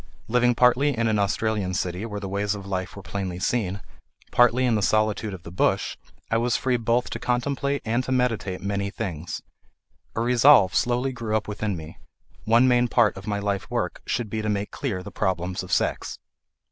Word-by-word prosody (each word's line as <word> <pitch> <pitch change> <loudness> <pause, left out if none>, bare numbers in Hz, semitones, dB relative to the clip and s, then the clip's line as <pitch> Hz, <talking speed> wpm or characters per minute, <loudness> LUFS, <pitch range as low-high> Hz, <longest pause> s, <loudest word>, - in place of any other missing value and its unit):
Living 120 +1 +3
partly 125 +2 +3
in 115 0 +1
an 110 -2 +2
Australian 100 -2 0
city 90 +5 -2
where 105 -2 -5
the 100 - -5
ways 100 +2 -1
of 100 -1 -8
life 95 -4 -3
were - - -9
plainly 95 -3 -4
seen, 100 -1 -1 0.5
partly 120 +1 +4
in 120 - +2
the 105 - +1
solitude 110 +1 +1
of 95 -3 -8
the 85 - -9
bush, 90 - +1 0.4
I 115 - +3
was 120 +1 +1
free 125 -2 +1
both 115 +1 0
to - - -4
contemplate 140 +3 -1
and 115 +3 +1
to - - -4
meditate 115 -8 0
many 100 0 -1
things. 85 -4 -5 0.7
A 115 - 0
resolve 120 -4 +6
slowly 125 +2 +1
grew 115 -3 -1
up 110 - -5
within 105 -2 -2
me: 80 +1 -10 0.5
one 115 +3 +5
main 125 -1 +4
part 115 -3 +3
of 95 +1 -10
my 105 -1 0
life 100 -1 -2
work - - -2
should 115 -4 -2
be 110 - -1
to 105 - -2
make 100 -1 -2
clear 105 -11 -3
the - - -8
problems 90 0 -1
of - - -9
sex. - - 0
110 Hz, 195 wpm, -25 LUFS, 100-120 Hz, 0.7 s, resolve